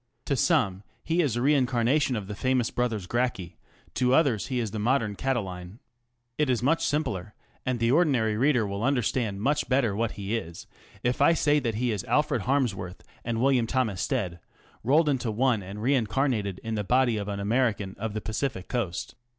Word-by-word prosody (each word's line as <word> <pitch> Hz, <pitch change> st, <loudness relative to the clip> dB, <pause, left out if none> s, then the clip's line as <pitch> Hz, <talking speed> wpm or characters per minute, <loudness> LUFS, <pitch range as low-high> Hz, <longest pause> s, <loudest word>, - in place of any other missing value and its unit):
To 140 Hz, -, 0 dB
some 120 Hz, -, +2 dB, 0.2 s
he 165 Hz, +2 st, +1 dB
is 140 Hz, -8 st, 0 dB
a 120 Hz, -, -1 dB
reincarnation 130 Hz, -1 st, +2 dB
of 105 Hz, -3 st, -3 dB
the 105 Hz, -, -6 dB
famous 130 Hz, +2 st, 0 dB
brothers 115 Hz, -6 st, -1 dB
Gracchi, 120 Hz, -4 st, -2 dB, 0.3 s
to 125 Hz, 0 st, +2 dB
others 135 Hz, -, +2 dB
he 130 Hz, -, -2 dB
is 110 Hz, -4 st, -2 dB
the 110 Hz, -, -4 dB
modern 115 Hz, -1 st, +1 dB
Catiline. 95 Hz, -7 st, -3 dB, 0.6 s
It 150 Hz, -3 st, +2 dB
is 120 Hz, -2 st, +1 dB
much 160 Hz, +5 st, +2 dB
simpler, 110 Hz, -, -2 dB, 0.3 s
and 130 Hz, -1 st, +1 dB
the 115 Hz, +1 st, +2 dB
ordinary 130 Hz, -9 st, +3 dB
reader 125 Hz, -1 st, +2 dB
will 100 Hz, +1 st, -4 dB
understand 120 Hz, -6 st, 0 dB
much 145 Hz, +3 st, +1 dB
better 125 Hz, -6 st, +2 dB
what 115 Hz, +1 st, -1 dB
he 100 Hz, +2 st, -3 dB
is 85 Hz, -7 st, -6 dB, 0.4 s
if 125 Hz, +2 st, 0 dB
I 145 Hz, -, +6 dB
say 150 Hz, -2 st, +3 dB
that 115 Hz, -5 st, -2 dB
he 120 Hz, +2 st, 0 dB
is 105 Hz, -4 st, -2 dB
Alfred -, -, +1 dB
Harmsworth 105 Hz, -10 st, -1 dB, 0.2 s
and 115 Hz, -1 st, -2 dB
W. 130 Hz, 0 st, +3 dB
T. 125 Hz, -5 st, 0 dB
Stead 90 Hz, -1 st, -2 dB, 0.4 s
rolled 150 Hz, +7 st, +3 dB
into 130 Hz, -5 st, 0 dB
one 115 Hz, 0 st, +1 dB
and 100 Hz, +3 st, -7 dB
reincarnated 120 Hz, -5 st, 0 dB
in 110 Hz, -, -3 dB
the 105 Hz, -1 st, -1 dB
body 125 Hz, +1 st, +2 dB
of 100 Hz, -1 st, -4 dB
an 100 Hz, -1 st, -3 dB
American 105 Hz, -2 st, 0 dB
of 110 Hz, 0 st, -4 dB
the 110 Hz, -, -2 dB
Pacific 110 Hz, -1 st, -3 dB
Coast. 105 Hz, -9 st, -3 dB
120 Hz, 185 wpm, -27 LUFS, 105-130 Hz, 0.6 s, I